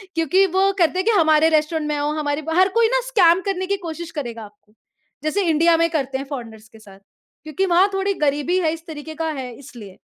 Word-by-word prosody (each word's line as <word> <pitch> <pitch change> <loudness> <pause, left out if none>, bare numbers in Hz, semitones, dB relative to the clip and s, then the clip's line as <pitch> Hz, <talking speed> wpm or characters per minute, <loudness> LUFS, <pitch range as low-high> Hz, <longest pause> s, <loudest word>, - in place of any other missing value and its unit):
क्योंकि 330 +4 +3
वो 390 +1 +3
करते 355 +2 +2
हैं 375 - -1
कि 460 - +3
हमारे 315 0 +4
रेस्टोरेंट 310 0 0
में 300 - -1
आओ 290 +1 -1
हमारे 290 0 -2
हर 370 +2 +4
कोई 465 -1 +5
ना - - +1
स्कैम 375 -7 +4
करने 380 -2 -2
की 400 - -1
कोशिश 340 -2 -7
करेगा। 235 -8 -6 0.7
जैसे 350 +7 0
इंडिया 330 +2 +3
में 335 0 +2
करते 270 -5 -2
हैं 275 - -6
फॉरेनर्स 225 -6 -8
के 220 - -17
साथ 195 -2 -16 0.4
क्योंकि 310 +5 -2
वहाँ 360 +3 +4
थोड़ी 390 +1 0
गरीबी 295 +5 +1
है 325 -4 +1
इस 330 0 -10
तरीक़े 315 0 -8
का 325 +1 -3
है 260 -4 -6
इसलिए। 235 -9 -12
320 Hz, 215 wpm, -21 LUFS, 290-365 Hz, 0.7 s, कोई